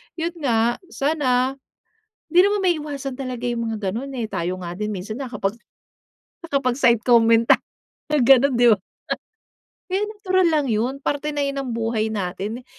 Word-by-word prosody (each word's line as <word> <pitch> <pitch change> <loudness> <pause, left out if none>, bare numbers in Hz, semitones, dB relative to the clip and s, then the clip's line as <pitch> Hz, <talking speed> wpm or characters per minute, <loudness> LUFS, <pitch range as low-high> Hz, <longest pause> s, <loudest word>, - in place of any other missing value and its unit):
yun 335 0 -2
nga, 235 -4 +1
sana, 275 -5 0 0.7
di 355 +1 +5
naman 405 +1 +2
maiiwasan 295 -7 -1
talaga 250 -2 -5
yung 235 -1 -2
mga 215 -3 -3
ganon, 270 +5 -4
eh, 230 - -1
tayo 180 -2 -3
nga 175 -1 -6
din 210 +3 -3
minsan 200 +1 -5
na 260 - -6
kapag, 200 -3 -2 0.9
nakapagside-comment 240 -5 +3
ta - - +6 0.5
na 300 - +2
gano'n 270 +1 +5
di 240 -1 +6
ba? 210 - +3 1.1
Kaya 380 +2 -1
natural 375 -4 +1
lang 300 -3 +1
yun, 230 +4 0
parte 290 +1 -2
na 290 -1 -1
yun 275 0 -2
ng 265 - -5
buhay 225 -1 -1
natin. 210 +4 -4
250 Hz, 155 wpm, -22 LUFS, 225-290 Hz, 1.1 s, ta